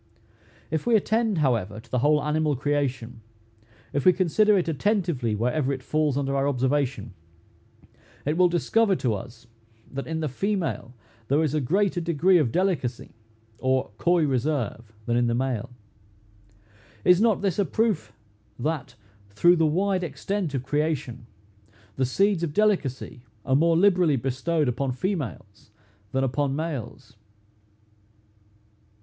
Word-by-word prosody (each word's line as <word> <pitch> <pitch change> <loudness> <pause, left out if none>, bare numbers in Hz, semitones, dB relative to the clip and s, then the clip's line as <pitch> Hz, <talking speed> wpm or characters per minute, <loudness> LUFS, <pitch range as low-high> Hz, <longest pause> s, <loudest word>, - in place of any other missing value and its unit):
If 160 +7 -2
we 235 - +4
attend, 220 -1 +1
however, 110 -5 -1
to 115 0 -17
the 125 - +1
whole 150 +3 +3
animal 150 -1 0
creation, 130 -4 -2 0.7
if 140 - 0
we 185 - +7
consider 195 +4 +3
it 180 - 0
attentively 165 - 0
wherever 125 +6 0
it 130 -1 -4
falls 150 -2 0
under 140 -1 -1
our 135 0 +1
observation, 130 -5 -1 1.1
it 150 +2 0
will 180 +1 +4
discover 195 +4 +2
to 125 -9 0
us, 115 +4 -8 0.5
that 140 0 -5
in 160 0 -3
the 155 - -1
female 165 - -3 0.3
there 145 +5 +2
is 150 -3 -1
a 155 - +1
greater 185 +6 +1
degree 170 +2 +3
of 130 -7 +1
delicacy 170 -9 -1 0.5
or 130 -3 0
coy 175 -2 +3
reserve 125 -5 -2
than 120 - 0
in 120 0 +2
the 115 - 0
male. 125 -3 -2 1.4
Is 180 +2 +5
not 220 -3 +2
this 195 -1 0
a - - +4
proof, 220 0 -1 0.5
that, 150 +1 -3 0.3
through 175 - +4
the 160 -1 +3
wide 185 +4 0
extent 170 +2 -3
of 130 - -2
creation, 140 -5 -2 0.7
the 130 -1 0
seeds 195 +6 +1
of 160 -4 -3
delicacy 175 - 0 0.2
are 130 - +2
more 165 +3 +3
liberally 180 -5 +4
bestowed 135 +5 -1
upon 125 +2 -1
females 130 - -5 0.4
than 135 0 0
upon 135 +1 0
males? 140 -6 -6
145 Hz, 140 wpm, -25 LUFS, 130-175 Hz, 1.4 s, we